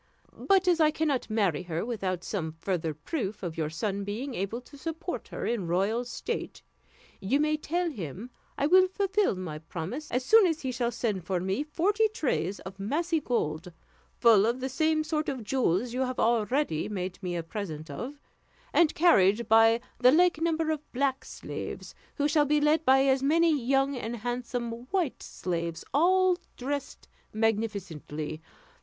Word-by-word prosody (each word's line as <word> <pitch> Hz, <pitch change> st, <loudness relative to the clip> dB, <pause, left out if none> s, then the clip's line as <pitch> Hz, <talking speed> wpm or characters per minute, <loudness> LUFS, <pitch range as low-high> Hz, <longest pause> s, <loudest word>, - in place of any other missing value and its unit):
But 385 Hz, -2 st, +2 dB
as 350 Hz, -2 st, +4 dB
I 310 Hz, -1 st, +5 dB
cannot 305 Hz, -5 st, -1 dB
marry 200 Hz, -8 st, +1 dB
her 170 Hz, 0 st, -3 dB
without 190 Hz, -7 st, -3 dB
some 160 Hz, -6 st, -3 dB
further 165 Hz, -1 st, -2 dB
proof 210 Hz, -, -4 dB
of 170 Hz, -3 st, -4 dB
your 155 Hz, -2 st, -1 dB
son 200 Hz, +5 st, -2 dB
being 230 Hz, +7 st, -4 dB
able 200 Hz, +3 st, -3 dB
to 270 Hz, -, -16 dB
support 325 Hz, +5 st, -5 dB
her -, -, -5 dB
in 220 Hz, -7 st, -1 dB
royal 200 Hz, +8 st, +1 dB
state, 245 Hz, -, -5 dB, 0.6 s
you 235 Hz, +9 st, +1 dB
may 305 Hz, +1 st, +2 dB
tell 345 Hz, +4 st, -1 dB
him 200 Hz, -, -7 dB, 0.3 s
I 280 Hz, -, +1 dB
will 370 Hz, +4 st, +6 dB
fulfill 390 Hz, -, +1 dB
my 175 Hz, -5 st, -5 dB
promise 180 Hz, -, -6 dB
as 250 Hz, +1 st, -1 dB
soon 440 Hz, +4 st, +7 dB
as 325 Hz, -2 st, -1 dB
he 260 Hz, -, -2 dB
shall 240 Hz, -1 st, -1 dB
send 215 Hz, -6 st, -2 dB, 0.2 s
me 190 Hz, +8 st, 0 dB
forty 385 Hz, +9 st, +1 dB
trays 250 Hz, -, -2 dB
of 190 Hz, +1 st, -10 dB
massy 320 Hz, -, 0 dB
gold, 180 Hz, -, -2 dB, 0.5 s
full 220 Hz, -3 st, +6 dB
of 240 Hz, +2 st, 0 dB
the 260 Hz, +1 st, -3 dB
same 315 Hz, +3 st, +1 dB
sort 310 Hz, -1 st, -1 dB
of 260 Hz, -4 st, -4 dB
jewels 235 Hz, -1 st, 0 dB
you 255 Hz, -, -1 dB
have 255 Hz, -1 st, -1 dB
already 235 Hz, -, +1 dB
made 185 Hz, -2 st, -4 dB
me 180 Hz, -2 st, -3 dB
a 170 Hz, -, -2 dB
present 165 Hz, -4 st, -6 dB
of, 285 Hz, +4 st, -6 dB, 0.5 s
and 335 Hz, -3 st, +4 dB
carried 225 Hz, -, +4 dB
by 225 Hz, +1 st, +5 dB, 0.2 s
the 250 Hz, 0 st, +6 dB
like 345 Hz, +1 st, +4 dB
number 325 Hz, -1 st, +1 dB
of 300 Hz, -1 st, -5 dB
black 265 Hz, +1 st, 0 dB
slaves, -, -, -7 dB, 0.2 s
who 290 Hz, -1 st, +1 dB
shall 300 Hz, 0 st, +3 dB
be 300 Hz, +1 st, +3 dB
led 300 Hz, +2 st, +3 dB
by 265 Hz, +1 st, +5 dB
as 265 Hz, -1 st, +3 dB
many 325 Hz, +4 st, +4 dB
young 270 Hz, +1 st, +1 dB
and 240 Hz, -1 st, -4 dB
handsome 240 Hz, +1 st, -3 dB, 0.2 s
white 350 Hz, -4 st, -1 dB
slaves, 170 Hz, -2 st, -4 dB
all 365 Hz, +4 st, +4 dB, 0.2 s
dressed 280 Hz, +2 st, -4 dB, 0.3 s
magnificently. 195 Hz, -9 st, -2 dB
245 Hz, 170 wpm, -28 LUFS, 195-305 Hz, 0.6 s, soon